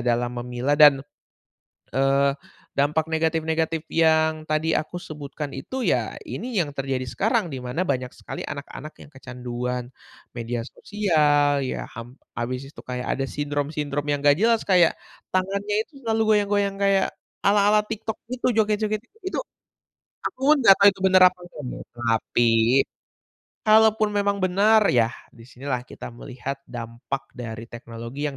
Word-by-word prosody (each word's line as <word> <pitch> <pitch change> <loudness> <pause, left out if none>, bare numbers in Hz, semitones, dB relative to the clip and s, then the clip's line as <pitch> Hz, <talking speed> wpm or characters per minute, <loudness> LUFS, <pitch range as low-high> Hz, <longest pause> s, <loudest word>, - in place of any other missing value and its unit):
dalam 120 0 0
memilah 125 +4 -1
dan, 145 -2 +7 1.0
eee, 135 +1 +3 0.5
dampak 150 +3 +2
negatif-negatif 160 0 0
yang 160 -1 +3
tadi 155 +1 +1
aku 155 +3 -4
sebutkan 145 -2 -7
itu 255 - -5
ya - - 0
ini 250 -1 -5
yang 150 -4 0
terjadi 135 -2 -2
sekarang, 220 - 0
di 130 - -4
mana 125 +8 -1
banyak 130 -6 -2
sekali - - -7
anak-anak 145 +1 -7
yang - - -17
kecanduan 125 -1 -5 0.4
media 120 0 -3
sosial. 150 -7 +2
Ya 130 - -3
ham 120 +2 -9 0.2
habis 125 +2 -3
itu - - -14
kayak 125 0 -4
ada 135 - 0
sindrom-sindrom 145 0 -2
yang 145 -1 +1
nggak 145 +2 +5
jelas 230 +1 +3
kayak 180 -3 +5 0.4
tangannya 200 +2 0
itu 285 -4 -16
selalu 225 -1 +1
goyang-goyang 205 -1 +1
kayak 195 -1 +3 0.4
ala-ala 205 +1 +5
TikTok 220 0 -5
itu, 255 0 -1
joget-joget, 215 0 +1 0.3
itu 375 - -2 0.9
aku - - -4 0.2
nggak 195 -6 +8
tahu 200 - +8
itu 190 - -14
benar 185 0 +5
apa 185 - -25
nggak 155 -4 -10
ya - - -7 0.2
tapi 115 0 +1 1.2
kalau 220 +1 +7
pun 215 - +2
memang 200 0 +1
benar 205 +4 +4
yah 120 -1 +3 0.2
di 115 - -15
sinilah 130 0 -4
kita - - -9
melihat 125 +3 -6
dampak 120 +3 -5
dari 115 -2 -6
teknologi, 115 +4 -7
yang 140 - -7
145 Hz, 145 wpm, -24 LUFS, 125-195 Hz, 1.2 s, nggak